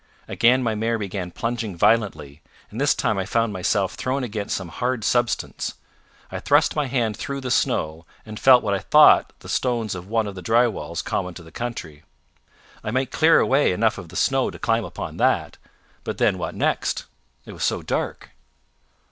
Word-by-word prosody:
Again 125 Hz, +2 st, +3 dB
my 115 Hz, -2 st, 0 dB
mare 115 Hz, +2 st, -1 dB
began 95 Hz, -3 st, -4 dB
plunging 115 Hz, -2 st, -4 dB
violently, 100 Hz, -8 st, +1 dB, 0.3 s
and 115 Hz, +5 st, -5 dB
this 145 Hz, -, +3 dB
time 110 Hz, -4 st, 0 dB
I 95 Hz, -, -2 dB
found 115 Hz, -2 st, 0 dB
myself 95 Hz, +1 st, 0 dB
thrown 130 Hz, +1 st, -2 dB
against 105 Hz, -3 st, -3 dB
some 95 Hz, -3 st, -7 dB
hard 125 Hz, +3 st, -2 dB
substance. 120 Hz, +1 st, -1 dB, 0.6 s
I -, -, -4 dB
thrust -, -, +3 dB
my 150 Hz, -2 st, 0 dB
hand 120 Hz, -5 st, 0 dB
through 140 Hz, +3 st, -5 dB
the 130 Hz, -1 st, -4 dB
snow, 80 Hz, -5 st, 0 dB, 0.2 s
and 110 Hz, -1 st, -8 dB
felt 130 Hz, -2 st, +6 dB
what 100 Hz, -2 st, 0 dB
I 100 Hz, -, 0 dB
thought 150 Hz, +8 st, +6 dB
the -, -, -12 dB
stones 120 Hz, -4 st, -1 dB
of 90 Hz, 0 st, -8 dB
one 110 Hz, +1 st, 0 dB
of 100 Hz, -, -5 dB
the 95 Hz, -, -8 dB
dry 115 Hz, +6 st, +3 dB
walls 110 Hz, -, -5 dB
common 90 Hz, -1 st, -3 dB
to 85 Hz, -, -10 dB
the 80 Hz, -, -15 dB
country. 85 Hz, -10 st, -6 dB, 0.8 s
I -, -, -3 dB
might 130 Hz, +3 st, -1 dB
clear 165 Hz, +1 st, +5 dB
away 135 Hz, -7 st, +3 dB
enough 110 Hz, +2 st, +1 dB
of 90 Hz, -3 st, -10 dB
the 90 Hz, -, -13 dB
snow 135 Hz, +4 st, +1 dB
to -, -, -9 dB
climb 115 Hz, -1 st, 0 dB
upon -, -, -7 dB
that; -, -, +1 dB, 0.5 s
but -, -, -4 dB
then -, -, +2 dB
what -, -, -4 dB
next -, -, -1 dB, 0.4 s
it -, -, -10 dB
was -, -, -6 dB
so -, -, 0 dB
dark? -, -, -3 dB
115 Hz, 190 wpm, -23 LUFS, 95-125 Hz, 0.8 s, felt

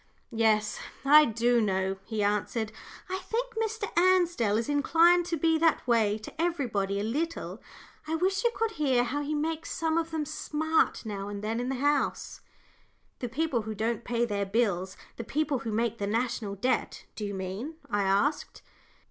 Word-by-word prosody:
"Yes, 215 Hz, -1 st, +2 dB, 0.3 s
I 300 Hz, +2 st, +8 dB
do 235 Hz, +1 st, +2 dB
know," 190 Hz, -2 st, 0 dB
he 220 Hz, -2 st, -2 dB
answered. 210 Hz, +2 st, 0 dB, 0.4 s
"I 375 Hz, 0 st, -3 dB
think 465 Hz, +5 st, -3 dB
Mr. 445 Hz, -1 st, -2 dB
Ansdell 345 Hz, -, +3 dB
is 230 Hz, -, -1 dB
inclined 335 Hz, +4 st, +4 dB
to 335 Hz, -2 st, -1 dB
be 320 Hz, +1 st, +2 dB
that 325 Hz, -1 st, +2 dB
way 220 Hz, -3 st, +3 dB
to 220 Hz, +8 st, -7 dB
everybody 230 Hz, -, 0 dB
a -, -, -1 dB
little. 310 Hz, +10 st, -3 dB, 0.5 s
I 320 Hz, -, 0 dB
wish 380 Hz, +5 st, 0 dB
you 475 Hz, -, +4 dB
could 450 Hz, 0 st, 0 dB
hear 265 Hz, -, +2 dB
how 280 Hz, +4 st, -2 dB
he 295 Hz, +1 st, -2 dB
makes 320 Hz, +2 st, -2 dB
some 325 Hz, 0 st, 0 dB
of 330 Hz, 0 st, -3 dB
them 320 Hz, -2 st, -2 dB
smart 315 Hz, -1 st, 0 dB
now 200 Hz, -2 st, -4 dB
and 205 Hz, 0 st, -6 dB
then 225 Hz, +2 st, -1 dB
in 245 Hz, +1 st, -2 dB
the 270 Hz, -, -1 dB
House." 290 Hz, +2 st, 0 dB, 0.8 s
"The 245 Hz, -, -3 dB
people 270 Hz, -1 st, 0 dB
who 215 Hz, 0 st, -5 dB
don't 225 Hz, +2 st, -1 dB
pay 240 Hz, 0 st, 0 dB
their 205 Hz, -3 st, -1 dB
bills 190 Hz, -4 st, 0 dB, 0.2 s
the 230 Hz, -, -4 dB
people 295 Hz, +2 st, -1 dB
who 230 Hz, -1 st, -4 dB
make 230 Hz, +1 st, -1 dB
the 200 Hz, -, -1 dB
National 225 Hz, -2 st, -1 dB
Debt, 250 Hz, +6 st, -1 dB
do 215 Hz, -, -5 dB
you 200 Hz, -1 st, -3 dB
mean?" 190 Hz, -, -5 dB
I 205 Hz, -, 0 dB
asked. 200 Hz, +10 st, 0 dB
245 Hz, 180 wpm, -28 LUFS, 215-320 Hz, 0.8 s, I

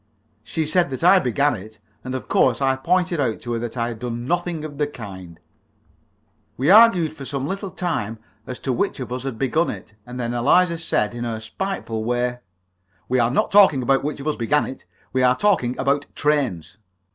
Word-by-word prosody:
She 160 Hz, -, -3 dB
said 170 Hz, +1 st, +2 dB
that 130 Hz, +3 st, -5 dB
I 185 Hz, +2 st, +7 dB
began 140 Hz, +1 st, +1 dB
it, 110 Hz, 0 st, -9 dB, 0.3 s
and 130 Hz, 0 st, -4 dB
of 130 Hz, -, -6 dB
course 125 Hz, -3 st, +3 dB
I 135 Hz, -1 st, +2 dB
pointed 175 Hz, +4 st, 0 dB
out 120 Hz, -6 st, 0 dB
to 120 Hz, 0 st, -4 dB
her 115 Hz, -, -1 dB
that 120 Hz, +1 st, -5 dB
I 115 Hz, 0 st, 0 dB
had 115 Hz, -2 st, -7 dB
done 120 Hz, 0 st, -4 dB
nothing 175 Hz, 0 st, -2 dB
of 145 Hz, -2 st, -9 dB
the 150 Hz, -, +1 dB
kind. 95 Hz, -, -10 dB, 1.2 s
We 140 Hz, +8 st, +3 dB
argued 195 Hz, -8 st, +6 dB
for 140 Hz, -, -9 dB
some 135 Hz, 0 st, -3 dB
little 195 Hz, +3 st, -4 dB
time 160 Hz, -, -3 dB, 0.3 s
as 125 Hz, -, -5 dB
to 130 Hz, -, -1 dB
which 200 Hz, +4 st, -1 dB
of 125 Hz, -1 st, -5 dB
us 130 Hz, +1 st, -5 dB
had 130 Hz, -4 st, -4 dB
begun 145 Hz, +7 st, +1 dB
it, -, -, -8 dB
and 125 Hz, +2 st, -8 dB
then 120 Hz, -1 st, -2 dB
Eliza 170 Hz, +8 st, +3 dB
said, 115 Hz, -9 st, 0 dB
in 120 Hz, 0 st, -5 dB
her 115 Hz, -2 st, -3 dB
spiteful 110 Hz, -, -4 dB
way 125 Hz, +1 st, -1 dB, 0.7 s
"We 130 Hz, 0 st, +1 dB
are 120 Hz, -1 st, +3 dB
not 130 Hz, -, 0 dB
talking 190 Hz, -10 st, +6 dB
about 135 Hz, +2 st, +2 dB
which 145 Hz, 0 st, -3 dB
of 140 Hz, -, -8 dB
us 155 Hz, -, 0 dB
began 135 Hz, +6 st, +1 dB
it; 130 Hz, -, -9 dB, 0.3 s
we 130 Hz, -, +1 dB
are 125 Hz, 0 st, +4 dB
talking 175 Hz, -12 st, +1 dB
about 140 Hz, +2 st, 0 dB
trains!" 135 Hz, -, -1 dB
130 Hz, 205 wpm, -22 LUFS, 120-155 Hz, 1.2 s, I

